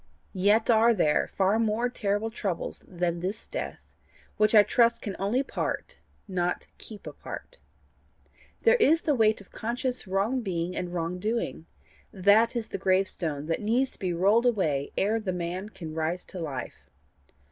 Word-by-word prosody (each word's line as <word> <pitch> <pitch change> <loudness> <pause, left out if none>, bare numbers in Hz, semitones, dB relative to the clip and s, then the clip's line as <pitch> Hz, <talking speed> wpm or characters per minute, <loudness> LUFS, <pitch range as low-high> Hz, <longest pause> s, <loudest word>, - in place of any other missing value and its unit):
Yet 205 +4 +3
are 230 +1 +5
there 150 -6 +2
far 195 +3 +1
more 225 +2 +1
terrible 215 -2 -1
troubles 195 -6 -3
than 175 -2 -2
this 190 +5 -4
death - - -5 0.6
which 215 +1 +3
I 210 - +9
trust 235 +2 +3
can 200 - -4
only 220 +8 +1
part, - - -4 0.3
not 180 -2 -1
keep 215 -2 -9
apart. - - -9 1.0
There 470 +1 +6
is 330 - +4
the 300 - +2
weight 220 -4 +3
of 195 - -17
conscious 245 +1 -3
wrong 200 +7 0
being 180 -4 -2
and 180 -1 -3
wrong 175 +1 -3
doing 215 -5 -2 0.4
that 205 +5 +4
is 230 -2 -3
the - - -4
gravestone 185 -6 0
that 165 +5 -1
needs 240 +5 +1
to - - -8
be 185 -2 -1
rolled 200 +8 +3
away 155 - 0
ere 210 +3 +2
a 215 -4 -2
man 180 +3 -4
can 165 -6 -8
rise 160 +3 -2
to 185 - -8
life. 145 -6 -6
200 Hz, 160 wpm, -27 LUFS, 180-230 Hz, 1.0 s, I